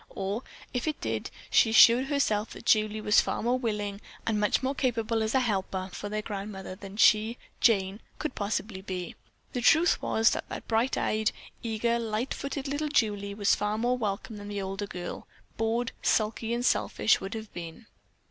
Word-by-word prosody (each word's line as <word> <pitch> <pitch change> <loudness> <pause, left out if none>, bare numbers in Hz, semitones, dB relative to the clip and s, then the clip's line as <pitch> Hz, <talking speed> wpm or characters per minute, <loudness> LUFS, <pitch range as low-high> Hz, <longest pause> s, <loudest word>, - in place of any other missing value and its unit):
Or, 195 +4 -2 0.3
if 245 +4 -2
it 310 - -1
did, 110 -1 -3 0.2
she 225 - +5
assured 235 +3 +7
herself 230 -7 0
that - - -11
Julie 215 0 +3
was 210 0 +5
far - - -3
more 245 +2 +2
willing 210 -4 -2 0.2
and 220 -2 +1
much 210 +4 +2
more 265 +1 +1
capable 230 -4 0
as 220 +3 0
a 265 - +5
helper 190 -4 -2
for 205 - -5
their 215 0 -2
grandmother 195 -2 -6
than 195 +1 -10
she, 220 +2 +5 0.2
Jane, 195 -3 +3 0.2
could 305 -4 -3
possibly 200 -1 -3
be. 185 -2 -5 0.4
The 245 - -1
truth 320 +7 +4
was 220 0 +3
that - - -5
bright 230 +3 +1
eyed, 215 0 +1 0.3
eager, 235 +1 0
light 225 +2 -2
footed 275 0 -4
little 290 +2 -2
Julie 205 -7 0
was 205 -1 +3
far 210 +1 0
more 240 +3 +1
welcome 215 -1 -3
than 205 0 -8
the 205 -1 -4
older 195 +1 -4
girl, 175 -2 -6 0.3
bored, 230 +2 0
sulky, 220 +1 +1
and 240 +1 0
selfish, 245 -1 +2
would 195 +3 -5
have 220 -1 -7
been. 170 +5 -8
215 Hz, 180 wpm, -28 LUFS, 200-235 Hz, 0.4 s, assured